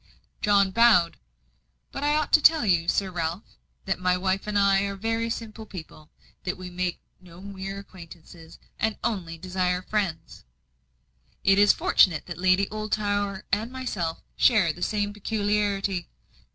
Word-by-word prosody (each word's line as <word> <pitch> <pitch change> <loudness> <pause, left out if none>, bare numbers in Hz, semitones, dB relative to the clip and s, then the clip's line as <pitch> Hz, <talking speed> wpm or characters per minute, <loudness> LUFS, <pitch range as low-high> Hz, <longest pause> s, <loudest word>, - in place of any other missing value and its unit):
John 200 -2 +3
bowed. 210 -6 +4 0.7
"But - - -5
I 295 +1 +2
ought 305 -1 -1
to 310 - +7
tell 315 -4 +5
you, 170 -4 +2
Sir 190 +1 0
Ralph, 170 +2 -3 0.4
that 195 -2 -1
my 180 0 +1
wife 190 +2 -1
and 210 -1 -1
I 200 -1 +4
are 200 0 -4
very 225 +3 -2
simple 220 -1 -6
people 160 -4 -11 0.3
that 180 - -3
we 180 -1 -8
make 180 0 -2 0.2
no 175 -1 -15
mere 195 0 -7
acquaintances, 170 -3 -13 0.2
and 220 0 0
only 180 -8 -3
desire 180 +1 -1
friends." 195 -6 -3 1.0
"It 195 0 +4
is 205 0 +7
fortunate 165 -6 +3
that 175 -1 -8
Lady 185 +2 +3
Oldtower 205 -2 -2
and 220 +4 0
myself 205 -11 -4
share 195 -9 +4
the 175 - -13
same 205 0 -1
peculiarity." 205 -3 -1
195 Hz, 150 wpm, -25 LUFS, 180-210 Hz, 1.0 s, to